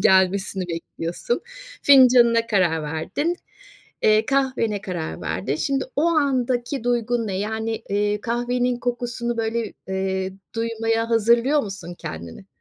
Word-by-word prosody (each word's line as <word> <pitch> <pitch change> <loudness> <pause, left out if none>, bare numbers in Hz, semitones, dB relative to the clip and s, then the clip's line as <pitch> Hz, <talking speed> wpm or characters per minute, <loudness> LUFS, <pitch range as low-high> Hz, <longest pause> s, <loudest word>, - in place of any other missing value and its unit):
gelmesini 190 0 +3
bekliyorsun. 170 +6 -3 0.4
Fincanına 245 -4 +6
karar 180 -8 +2
verdin. 170 - -2 0.7
Eee, 215 +1 +4
kahvene 255 -6 0
karar 130 - -5
verdin. 130 +11 -2
Şimdi 270 - 0
o 285 - +2
andaki 265 -5 0
duygun 240 -1 0
ne? 190 -2 -2
Yani, 220 +2 -2
ııı, 205 +1 +1
kahvenin 245 +2 0
kokusunu 240 -1 -3
böyle, 225 -1 -2 0.2
ııı, 190 0 -1 0.2
duymaya 225 0 -1
hazırlıyor 235 +6 +3
musun 190 -4 -7
kendini? 85 - -8
225 Hz, 115 wpm, -23 LUFS, 190-245 Hz, 0.7 s, Fincanına